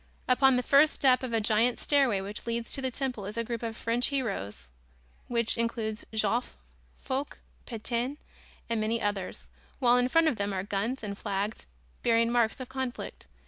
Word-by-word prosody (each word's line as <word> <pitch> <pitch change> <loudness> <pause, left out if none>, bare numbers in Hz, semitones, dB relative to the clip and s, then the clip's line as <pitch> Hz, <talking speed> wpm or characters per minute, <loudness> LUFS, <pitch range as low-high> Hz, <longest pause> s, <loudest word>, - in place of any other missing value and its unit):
Upon 265 +1 +5
the 250 - +1
first 290 +3 +5
step 255 -2 +4
of 255 -2 -4
a 225 - +2
giant 220 +3 +2
stairway 270 -9 +3
which 205 +4 -7
leads 235 0 -2
to 275 - -2
the 260 - 0
temple 250 -6 -3
is 210 +2 -7
a 230 - +1
group 230 0 -4
of 225 -1 -4
French 235 +2 +1
heroes 195 - -3 0.6
which 235 -1 +1
includes 230 -2 -2
Joffre, 220 +2 0 0.4
Foch, 270 +1 -4 0.3
Petain 240 +3 -2 0.5
and 230 -2 0
many 225 +2 0
others, 205 -3 -3 0.3
while 245 -2 +4
in 250 0 +2
front 330 +3 +4
of 255 - +1
them 200 0 -1
are 185 -1 -2
guns 220 +6 -2
and 200 -1 -4
flags 205 +1 -3 0.3
bearing 230 -1 +3
marks 235 -1 +2
of 255 - -6
conflict. 260 -1 -5
235 Hz, 180 wpm, -29 LUFS, 215-255 Hz, 0.6 s, Upon